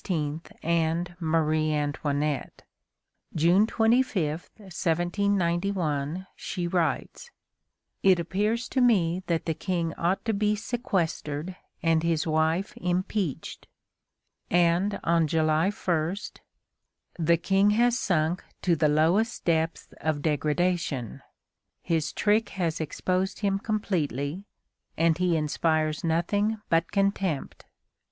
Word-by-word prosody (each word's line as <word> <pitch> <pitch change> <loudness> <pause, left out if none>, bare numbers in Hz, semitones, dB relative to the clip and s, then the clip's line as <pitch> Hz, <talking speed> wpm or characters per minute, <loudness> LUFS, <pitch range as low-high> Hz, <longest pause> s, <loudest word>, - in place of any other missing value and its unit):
and 170 +1 0
Marie 155 -1 +1
Antoinette. 145 -1 -2 0.7
June 175 +7 +4
25, 225 -10 +1
1791, 175 -3 -1
she 175 - -4
writes: 175 - -1 0.7
"It 190 -2 +5
appears 210 +7 -1
to 260 - +1
me 185 -8 +3
that 165 -1 0
the 160 - 0
King 170 -1 -2
ought 180 +3 0
to 225 - +1
be 210 +1 +1
sequestered 185 - -2 0.3
and 165 -1 +3
his 165 -1 0
wife 160 +4 +1
impeached." 180 -2 -2 0.8
And 175 +4 +2
on 165 -1 +2
July 155 +3 +2
1: 175 -4 -1 1.0
"The 170 +1 +3
King 195 +4 +3
has 240 +3 +3
sunk 170 -1 0 0.2
to 175 -2 +3
the 155 -1 +2
lowest 165 +9 +2
depths 165 -1 0
of 155 -2 -1
degradation; 150 - -1 0.6
his 160 -3 0
trick 215 +1 +1
has 165 -3 -1
exposed 185 +5 -2
him 195 -1 +1
completely, 180 - -2 0.5
and 165 +1 +2
he 180 -2 +2
inspires 155 0 0
nothing 200 +7 0
but 165 0 +2
contempt. 195 -6 -1
170 Hz, 105 wpm, -27 LUFS, 160-195 Hz, 1.0 s, It